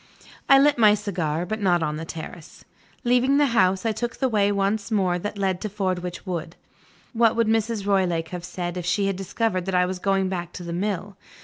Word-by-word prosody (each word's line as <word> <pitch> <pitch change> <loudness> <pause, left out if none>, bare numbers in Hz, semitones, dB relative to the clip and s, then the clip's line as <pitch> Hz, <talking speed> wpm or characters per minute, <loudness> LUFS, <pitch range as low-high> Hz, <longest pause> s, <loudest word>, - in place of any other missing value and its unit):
I 275 - +8
lit 285 -1 +4
my 210 -2 +6
cigar, 175 -6 -2
but 215 +3 -4
not 175 -4 +2
on 150 -1 -2
the 165 - -5
terrace. 165 0 -9 0.4
Leaving 250 +3 +3
the 290 - +4
house, 185 -1 +3
I 225 - +2
took 240 +2 -3
the 265 - 0
way 205 -4 +2
once 200 +1 0
more 185 -5 +1
that 205 +3 -5
led 190 -2 -1
to 215 - -3
Fordwitch 185 -3 -3
Wood. 170 -3 -4 0.6
What 230 -1 +3
would 230 0 +2
Mrs. 220 -1 0
Roylake 180 -5 +1
have 180 -1 -6
said, 175 0 -5
if 175 - -4
she 200 +2 +1
had 195 -1 0
discovered 195 0 -2
that 190 - -1
I 180 0 +4
was 185 0 -4
going 195 0 +1
back 175 -2 -4
to 180 - -7
the 170 0 -5
mill? 195 +1 -3
195 Hz, 215 wpm, -24 LUFS, 180-215 Hz, 0.6 s, I